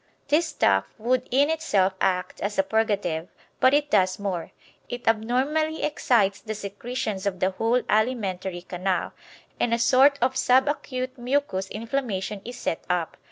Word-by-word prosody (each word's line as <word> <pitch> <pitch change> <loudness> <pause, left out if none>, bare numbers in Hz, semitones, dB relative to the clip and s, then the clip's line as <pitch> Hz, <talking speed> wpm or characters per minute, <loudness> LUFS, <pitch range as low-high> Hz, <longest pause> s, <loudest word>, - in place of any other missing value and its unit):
This 315 +3 +3
stuff 95 - +2
would 245 +3 0
in 285 +4 +3
itself 195 -12 +1
act 180 -1 0
as 205 +1 -2
a 195 - +4
purgative, 200 -6 0 0.3
but 260 - +5
it 290 +1 +1
does 185 0 +3
more, 190 -5 -3 0.4
it 245 0 -6
abnormally 265 +8 +1
excites 220 -9 +2
the 215 -1 -5
secretions 205 0 -4
of 185 -2 -2
the 185 +1 +2
whole 225 +6 +1
alimentary 195 -6 0
canal, 185 0 -2 0.5
and 235 -1 +2
a - - -1
sort 265 +4 +5
of 255 +2 +1
sub 260 +1 +4
acute 255 -3 -3
mucous 240 -7 -1
inflammation 215 -4 -3
is 245 +1 -8
set 165 - -3
up. 175 -2 -1
225 Hz, 155 wpm, -25 LUFS, 190-255 Hz, 0.5 s, but